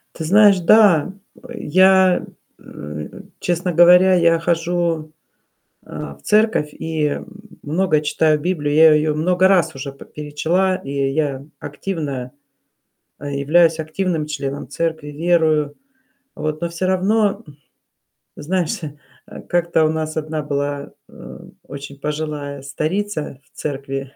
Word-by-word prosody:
Ты 160 - -5
знаешь, 200 +2 +5
да. 195 -2 +4 0.3
Э, 245 -1 -10
я, 185 +1 +4 0.3
э, 75 +1 -9 0.2
честно 175 0 -1
говоря, 180 +2 +6
я 170 -1 +3
хожу, 165 -2 -1 0.7
э, - - -22 0.3
в - - -26
церковь 210 -8 +2
и 155 -2 -2 0.4
много 160 +1 +1
читаю 155 0 +1
Библию. 150 -4 -1
Я 160 0 +7
ее 150 0 +1
много 180 +4 +2
раз 185 -7 +2
уже 135 +1 -6
п 140 - -14
перечла, 165 +6 -1
и 140 -7 -9 0.2
я 140 -3 -2 0.2
активно 145 -5 -5 0.9
э, 145 0 -6
являюсь 160 +3 +3
активным 160 0 -2
членом 140 -2 -5
церкви, 160 -3 -3
верую. 155 -2 +1 0.6
Вот. 155 0 -4
Но 170 - -2
всё 170 +2 -3
равно, 200 +3 +1
м 145 -1 -15 0.8
Знаешь, 170 +2 -2
э, 150 0 -11
как-то 170 -2 +1
у 155 - +2
нас 155 0 -3
одна 155 0 -3
была, 145 -1 -3 0.2
э, - - -12 0.3
очень 140 0 -9
пожилая 150 -2 -4
старица 155 +2 -3
в - - -35
церкви, 135 -1 -5
155 Hz, 125 wpm, -19 LUFS, 145-180 Hz, 0.9 s, Я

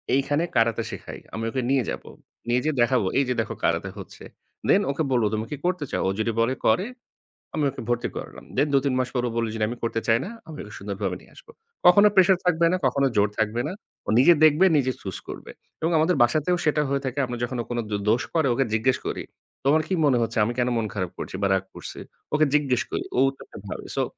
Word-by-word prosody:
এইখানে 145 +3 +1
কারাতে 115 0 +2
শেখায়।" - - -8
আমি 115 - -4
ওকে 130 +2 -2
নিয়ে 135 -2 +3
যাবো। - - -6 0.4
নিয়ে 120 +1 +2
যেয়ে 155 -1 0
দেখাবো, 120 -3 +3
"এইযে 130 -2 +1
দেখো 110 - -5
কারাতে - - +1
হচ্ছে।" - - -10 0.5
দেন, - - +5
ওকে 150 +3 -1
বলবো, 120 -4 +3
"তুমি 110 +1 -1
কি 150 - -3
করতে 180 -4 0
চাও?" - - -1
ও - - +2
যদি 115 +1 +1
বলে 120 +3 +2
করে, 180 - +3 0.7
আমি 155 - 0
ওকে 125 - -8
ভর্তি 120 0 0
করালাম। - - -8
দেন 145 +3 +3
২-৩ 140 -1 +2
মাস 130 - 0
পর 125 - +1
ও - - -1
বলে 115 0 0
যদি, 110 -1 -2
"আমি 120 - -5
করতে 115 -1 0
চাই 115 0 +5
না।" - - -6 0.2
আমি 155 -2 -8
ওকে 105 - -11
সুন্দরভাবে 100 +1 -3
নিয়ে - - -20
আসবো। 485 -2 -15 0.3
কখনো 200 +4 +8
প্রেশার 190 0 +6
থাকবে 170 -1 +3
না, 185 - +2
কখনো 135 +2 +2
জোর 105 0 +3
থাকবে 110 +2 +1
না। 180 - -4 0.3
ও - - -3
নিজে 135 +7 +7
দেখবে, 155 +4 +6
নিজে 130 -2 +2
চুজ 95 -2 -5
করবে। - - -8 0.3
এবং 165 +2 +1
আমাদের 160 +4 +3
বাসাতেও 155 +9 +2
সেটা 150 0 +3
হয়ে 140 0 0
থাকে। 130 +2 -2
আমরা 120 -1 -5
যখন 125 +1 -2
ও - - -4
কোনো 120 0 0
দো 105 - -1
দোষ 115 +3 +3
করে, 160 -4 +2
ওকে 135 +3 +1
জিজ্ঞেস 125 +4 +2
করি, - - -3 0.4
"তোমার 150 +3 +4
কি - - -1
মনে 130 -4 +4
হচ্ছে? 115 - -2
আমি 120 - -2
কেন 125 - +2
মন 115 - 0
খারাপ 90 -4 -3
করছি - - -6
বা 100 - +3
রাগ 95 0 +1
করছি?" - - -8 0.3
ওকে 155 +1 +4
জিজ্ঞেস 135 -4 +2
করি, - - -2
ও - - -1
উত্তরটা 135 - -12
ভাবে। - - -6
সো, - - +2
130 Hz, 235 wpm, -25 LUFS, 115-150 Hz, 0.7 s, কখনো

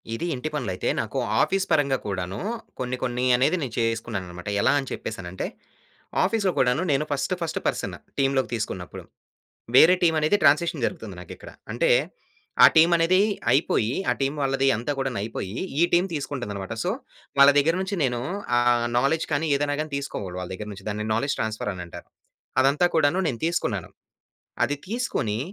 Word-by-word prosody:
ఇది 170 - -3
ఇంటి 130 +5 -4
పనులు 125 -10 -2
అయితే, - - -2
నాకు - - -5 0.2
ఆఫీస్ 195 0 +1
పరంగా 140 -2 +3
కూడాను, 95 -2 -3 0.4
కొన్ని, 130 0 -2
కొన్ని 125 0 -1
అనేది 135 +8 +2
నేను 125 -4 -5
చేసుకున్నాను 115 -3 -1
అన్నమాట. 90 +3 -7
ఎలా - - +4
అని 135 - -5
చెప్పేసానంటే, 95 -4 -5 0.8
ఆఫీస్‌లో 195 -1 +1
కూడాను, 125 +4 +2
నేను 140 +1 +2
ఫస్ట్, 145 +6 0
ఫస్ట్ 165 - -2
పర్సన్ - - -2 0.2
టీమ్‌లోకి 135 -1 +1
తీసుకున్నపుడు. 95 -5 -5 0.7
వేరే 165 +7 +8
టీమనేది 160 +3 +3
ట్రాన్సిషన్ 150 +4 +3
జరుగుతుంది - - -5
నాకు - - -11
ఇక్కడ. - - -11 0.2
అంటే, - - +1 0.7
ఆ - - +13
టీమనేది 170 +3 +5 0.3
అయిపోయి, 125 -5 +2 0.2
ఆ - - +3
టీమ్ 135 +2 0
వాళ్ళది 135 0 +1
అంతా 120 +6 -3
కూడాను 135 -5 -2
అయిపోయి 105 -2 -5 0.3
ఈ - - +7
టీమ్ 175 +2 +4
తీసుకుంటుంది 135 -6 -4
అన్నమాట. 100 +1 -5
సో, - - 0 0.5
వాళ్ళ 140 0 +9
దగ్గర 160 +4 +2
నుంచి, 190 +1 -3
నేను 125 -3 0 0.4
ఆహ్, 120 -1 +3
నౌలెడ్జ్ 140 +6 +1
కాని 150 +3 +1
ఏదైనా 145 0 0
గాని 155 -1 -6
తీసుకోవాలి 100 -10 -5
వాళ్ళ 90 - -6
దగ్గర 105 +2 -7
నుంచి. 100 - -12
దాన్ని 105 +1 -3
నౌలెడ్జ్ 140 +6 0
ట్రాన్స్‌ఫర్ 110 -1 -2
అని 90 - -6
అంటారు. - - -11 0.5
అదంతా 140 +6 +3
కూడాను 160 +3 +3
నేను 120 -4 -4
తీసుకున్నాను. 120 - -1 0.8
అది 145 - -3
తీసుకొని, 195 - -2
135 Hz, 165 wpm, -25 LUFS, 110-155 Hz, 0.8 s, ఆ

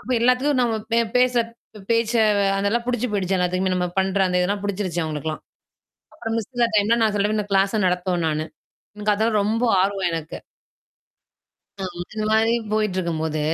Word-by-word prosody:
அப்போ 255 - -4
எல்லாருக்கும் 255 +3 +2
நம்ம 235 -2 +1 0.2
பே 230 - +4 0.2
பேசுகிற 250 -1 +3 0.5
பேச்சு 230 0 +2 0.4
அதெல்லாம் 200 +4 0
பிடித்துப் 245 -2 -1
போயிடுச்சி 195 -2 0
எல்லாருக்குமே 185 +1 0
நம்ம 180 0 0
பண்ணுகிற 190 +1 +2
அந்த 180 0 +1
இதெல்லாம் 200 +3 -1
பிடிச்சிடுச்சி 190 -3 -2
அவங்களுக்கெல்லாம். 155 0 -4 0.7
அப்புறம் 225 -1 -4
மிஸ் 225 - -3
அந்த 255 - -15
இல்லாத 235 -1 +3
டைம்ல் 220 +3 +3
நான் 215 - +2
சொல்லுவேன் 205 +1 +1
இந்தச் 205 -1 -4
கிளாஸ்யை 195 +3 +2
நடத்துவேன் 180 -1 0
நானு. 155 0 -1 0.5
எனக்கு 210 0 0
அதெல்லாம் 215 +1 +1
ரொம்ப 220 +3 0 0.2
ஆர்வம் 195 -1 +1
எனக்கு. 165 -1 -5 1.4
அ - - -2 0.2
அந்த 215 +4 -5
மாரி 220 +1 +3 0.2
போயிட்டு 190 -5 0
போது, 155 -1 -2
205 Hz, 165 wpm, -22 LUFS, 185-230 Hz, 1.4 s, பே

